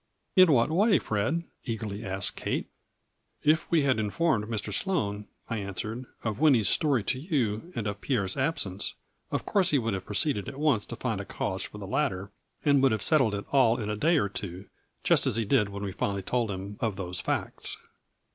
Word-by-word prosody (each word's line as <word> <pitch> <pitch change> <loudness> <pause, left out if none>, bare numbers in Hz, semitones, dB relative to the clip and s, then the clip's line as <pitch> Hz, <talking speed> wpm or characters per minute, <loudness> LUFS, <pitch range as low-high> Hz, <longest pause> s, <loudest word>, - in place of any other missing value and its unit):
" - - -48
In 185 -4 +7
what 125 +1 +4
way, 200 +3 +4
Fred? 110 +9 -1
" - - -47
eagerly 110 -3 -4
asked 95 -1 -2
Kate. - - -2 0.4
" - - -44
If 160 - -5
we 165 -3 +3
had 130 -4 +2
informed 110 +2 +1
Mr. 105 -2 -3
Sloane," 105 - -1 0.2
I 115 - -2
answered 110 +5 -5
" - - -30
of 110 0 -2
Winnie's 130 -10 +5
story 140 -8 +2
to 130 +5 -1
you, 135 - -1
and 110 - -2
of 100 -1 -3
Pierre's 100 -9 0
absence, 130 - -1 0.3
of - - -2
course 190 -3 +3
he 150 - +3
would 115 -4 0
have 95 -1 -4
proceeded 105 0 0
at 135 - -9
once 140 -8 +2
to - - -6
find - - -2
a - - -5
cause - - -2
for - - -9
the - - -7
latter, 95 +1 -1 0.3
and 140 -2 +5
would 135 -2 +5
have 110 -2 0
settled 130 -9 +3
it 100 - -5
all 125 -3 +4
in 105 -2 -2
a - - -1
day 160 +10 +3
or 120 - +2
two, 95 -1 -6 0.4
just - - +4
as - - +1
he 115 -1 +1
did 105 -2 +3
when 100 0 -6
we 100 - -2
finally 100 0 -2
told 120 +2 0
him 100 +1 -5
of 110 -4 -1
those 90 -2 -4
facts. - - -2
110 Hz, 215 wpm, -28 LUFS, 100-140 Hz, 0.4 s, In